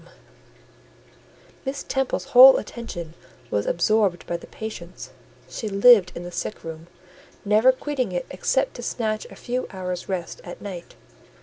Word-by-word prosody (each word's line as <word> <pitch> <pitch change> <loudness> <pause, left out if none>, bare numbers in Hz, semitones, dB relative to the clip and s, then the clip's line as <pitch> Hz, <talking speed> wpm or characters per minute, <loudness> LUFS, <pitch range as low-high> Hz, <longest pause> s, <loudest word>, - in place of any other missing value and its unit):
Miss 275 +1 -4
Temple's 265 -1 -1
whole 260 +2 +10
attention 175 -9 -7 0.4
was 105 0 0
absorbed 190 0 +1
by 175 - -3
the - - -8
patients: 180 -5 -8 0.4
she 220 - -5
lived 200 -2 +6
in 170 - -6
the 175 - -7
sick 210 - -5
room, 165 0 -8 0.6
never 215 +5 +5
quitting 260 -4 -3
it 175 -1 -3
except 265 +8 0
to - - -7
snatch 215 -3 -2
a - - -12
few 250 +1 -3
hours' 180 -1 -5
rest 180 -3 -4
at 175 - -9
night. 185 -4 -8
205 Hz, 140 wpm, -24 LUFS, 175-245 Hz, 0.6 s, whole